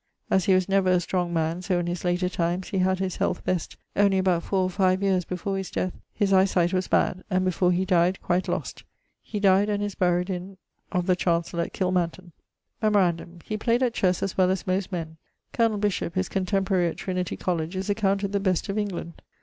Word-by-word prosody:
As 190 Hz, -3 st, +3 dB
he 190 Hz, -, +5 dB
was 185 Hz, -1 st, +2 dB
never 195 Hz, -1 st, +2 dB
a 180 Hz, -1 st, +4 dB
strong 175 Hz, 0 st, -1 dB
man, 165 Hz, +1 st, -1 dB
so 185 Hz, -1 st, 0 dB
in 175 Hz, -, -1 dB
his 175 Hz, 0 st, -3 dB
later 180 Hz, +1 st, +1 dB
times 175 Hz, +1 st, -2 dB
he 195 Hz, -, -1 dB
had 185 Hz, 0 st, +2 dB
his 190 Hz, -1 st, -3 dB
health -, -, -1 dB
best, 180 Hz, -3 st, -2 dB, 0.2 s
only 200 Hz, -1 st, +4 dB
about 185 Hz, -3 st, +2 dB
four 190 Hz, +2 st, 0 dB
or 185 Hz, -, 0 dB
five 185 Hz, 0 st, +2 dB
yeares 185 Hz, -3 st, +2 dB
before 195 Hz, +2 st, -3 dB
his 190 Hz, -, -5 dB
death 185 Hz, -, -2 dB, 0.2 s
his 200 Hz, -2 st, 0 dB
eie 190 Hz, 0 st, +6 dB
sight 175 Hz, -1 st, +1 dB
was 185 Hz, 0 st, 0 dB
bad, 185 Hz, -, +1 dB
and 185 Hz, -1 st, +1 dB
before 180 Hz, 0 st, +2 dB
he 180 Hz, +1 st, +1 dB
dyed 180 Hz, 0 st, +2 dB
quite 180 Hz, +1 st, 0 dB
lost. -, -, -4 dB, 0.4 s
He 210 Hz, -, -5 dB
dyed... 200 Hz, +1 st, +4 dB
and 205 Hz, 0 st, 0 dB
is 205 Hz, -1 st, -3 dB
buryed 180 Hz, +1 st, +1 dB
in... 185 Hz, +1 st, -6 dB, 0.3 s
of 180 Hz, -2 st, 0 dB
the 185 Hz, -1 st, +3 dB
chancell 170 Hz, -1 st, 0 dB
at -, -, -7 dB
Kilmanton. 180 Hz, -1 st, -1 dB, 0.5 s
Memorandum: 180 Hz, -5 st, +1 dB
he 215 Hz, -, -3 dB
played 235 Hz, +3 st, +1 dB
at 245 Hz, -2 st, +1 dB
chesse 185 Hz, -5 st, +1 dB
as 195 Hz, -, -2 dB
well 185 Hz, -1 st, +3 dB
as 190 Hz, +1 st, -1 dB
most 190 Hz, +1 st, -1 dB
men. 160 Hz, -3 st, -5 dB, 0.4 s
Col. 225 Hz, -3 st, +2 dB
Bishop, 200 Hz, -4 st, -1 dB
his 185 Hz, -1 st, 0 dB
contemporary 190 Hz, -1 st, +1 dB
at 165 Hz, -, -4 dB
Trinity 180 Hz, -1 st, -3 dB
Coll., 175 Hz, -3 st, -1 dB
is 185 Hz, +5 st, -4 dB
accounted 200 Hz, -1 st, 0 dB
the 200 Hz, -, +1 dB
best 185 Hz, -1 st, 0 dB
of 200 Hz, +2 st, -1 dB
England. 185 Hz, -5 st, -5 dB
185 Hz, 220 wpm, -25 LUFS, 180-195 Hz, 0.5 s, eie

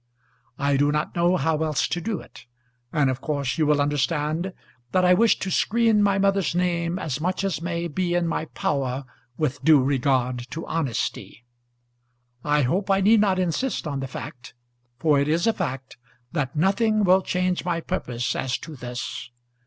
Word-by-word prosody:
I 140 Hz, 0 st, +1 dB
do 145 Hz, +1 st, +3 dB
not 150 Hz, +1 st, -2 dB
know 175 Hz, +1 st, +3 dB
how 160 Hz, -2 st, 0 dB
else 155 Hz, -3 st, +1 dB
to 175 Hz, -, -2 dB
do 205 Hz, 0 st, -2 dB
it; -, -, -15 dB, 0.4 s
and 150 Hz, -3 st, +2 dB
of 130 Hz, 0 st, -5 dB
course 140 Hz, -2 st, -2 dB
you 155 Hz, -, +3 dB
will 150 Hz, -1 st, +3 dB
understand 150 Hz, +4 st, 0 dB, 0.4 s
that 185 Hz, 0 st, +3 dB
I 180 Hz, -, +6 dB
wish 225 Hz, +4 st, +4 dB
to 190 Hz, -, -4 dB
screen 225 Hz, +2 st, +3 dB
my 200 Hz, -1 st, +3 dB
mother's 195 Hz, -3 st, +1 dB
name 175 Hz, -1 st, 0 dB
as 155 Hz, -6 st, -3 dB
much 185 Hz, +3 st, -1 dB
as 195 Hz, -4 st, -1 dB
may 170 Hz, 0 st, -2 dB
be 175 Hz, +2 st, -1 dB
in 175 Hz, -1 st, +1 dB
my 165 Hz, -, -1 dB
power 135 Hz, -3 st, -2 dB, 0.3 s
with 145 Hz, -4 st, -2 dB
due 150 Hz, -3 st, +6 dB
regard 130 Hz, -2 st, 0 dB
to 165 Hz, -, -6 dB
honesty. 135 Hz, -5 st, -3 dB, 1.0 s
I 150 Hz, -1 st, +2 dB
hope 185 Hz, +11 st, 0 dB
I 195 Hz, 0 st, +3 dB
need 215 Hz, +3 st, +5 dB
not 195 Hz, -3 st, +2 dB
insist 185 Hz, +8 st, -1 dB
on 140 Hz, -3 st, -3 dB
the 135 Hz, -, -4 dB
fact, 125 Hz, -1 st, -9 dB, 0.4 s
for 150 Hz, +1 st, +3 dB
it 140 Hz, -, +1 dB
is 165 Hz, +3 st, +1 dB
a 225 Hz, -, +3 dB
fact, 135 Hz, -9 st, -5 dB, 0.3 s
that 145 Hz, -4 st, -2 dB
nothing 210 Hz, +6 st, +2 dB
will 190 Hz, 0 st, +5 dB
change 180 Hz, 0 st, -1 dB
my 170 Hz, -1 st, -1 dB
purpose 125 Hz, -9 st, -3 dB
as 130 Hz, -1 st, -1 dB
to 160 Hz, -2 st, -9 dB
this. 125 Hz, -2 st, -6 dB
160 Hz, 180 wpm, -24 LUFS, 140-185 Hz, 1.0 s, I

